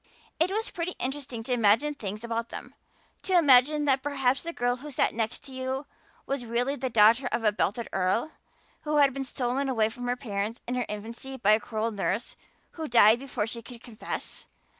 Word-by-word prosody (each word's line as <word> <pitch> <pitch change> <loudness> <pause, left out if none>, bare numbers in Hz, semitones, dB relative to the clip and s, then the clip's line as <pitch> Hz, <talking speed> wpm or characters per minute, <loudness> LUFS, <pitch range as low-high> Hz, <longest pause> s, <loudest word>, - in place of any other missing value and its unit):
It 330 +3 +3
was 435 +4 -2
pretty 355 +1 -3
interesting 260 -3 -4
to 250 - -1
imagine 230 +6 +3
things 210 -5 -6
about 230 0 -3
them 250 +2 -8 0.5
to 375 -2 +2
imagine 295 -1 +5
that 270 -2 +3
perhaps 270 -2 +1
the 335 - -4
girl 245 -5 0
who 295 +4 -9
sat 275 - +1
next 225 +1 -2
to 275 - -9
you 260 +2 -3 0.4
was 275 -2 -2
really 240 +4 -1
the 260 -1 -3
daughter 230 +3 +5
of 235 - -1
a 210 - +4
belted 210 +2 -1
earl, 195 +10 +1 0.5
who 300 0 -2
had 280 -2 +5
been 275 0 -3
stolen 265 +1 -2
away 220 -4 +2
from 245 +2 -6
her 245 - +1
parents 215 -1 -3
in 245 - -2
her 250 -1 -1
infancy 230 +6 -6
by 210 -4 +3
a 215 - +5
cruel 220 +1 -2
nurse 200 +1 -2 0.4
who 320 -2 -5
died 230 -2 +6
before 260 -6 -3
she 230 +1 -5
could 235 +1 -12
confess. 235 -2 -6
245 Hz, 200 wpm, -27 LUFS, 225-275 Hz, 0.5 s, died